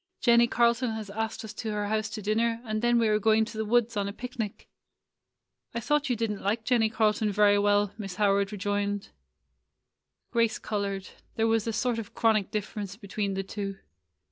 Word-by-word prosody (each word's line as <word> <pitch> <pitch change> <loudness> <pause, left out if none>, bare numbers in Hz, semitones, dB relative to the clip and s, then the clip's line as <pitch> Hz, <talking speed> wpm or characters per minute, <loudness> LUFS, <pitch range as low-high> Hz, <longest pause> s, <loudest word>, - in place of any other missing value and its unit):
Jennie 235 -1 +5
Carl 235 0 +4
ton 250 +1 -2
has 215 -2 -6
asked 220 +1 -3
us 215 - -8
to 220 +1 -5
her 210 0 -1
house 215 +1 -1
to 215 -1 -6
dinner, 225 +2 +1
and 215 -1 -2
then 240 0 +3
we 230 -1 +3
are 210 0 +3
going 220 +1 +3
to 220 - -10
the 220 - -1
woods 235 +1 +2
on 200 -1 0
a - - -3
picnic.'' 235 -2 -6 1.1
"I - - 0
thought 295 +5 +1
you 245 - +2
did 225 -1 -1
n't 205 - -5
like 215 +3 0
Jennie 225 -2 +3
Carlton 215 -1 +1
very 205 0 +4
well," 205 0 +2
Mrs. 195 -3 -5
Howard 200 -1 +2
rejoined. 205 0 -2 1.2
Grace 230 -2 +2
colored. 200 -2 -3 0.3
There 225 -2 +1
was 225 0 +1
a - - +1
sort 230 +2 0
of 215 - -8
chronic 220 -3 +2
difference 205 -1 -4
between 200 -1 -3
the 195 - -2
two. 195 0 -5
215 Hz, 195 wpm, -28 LUFS, 205-230 Hz, 1.2 s, Jennie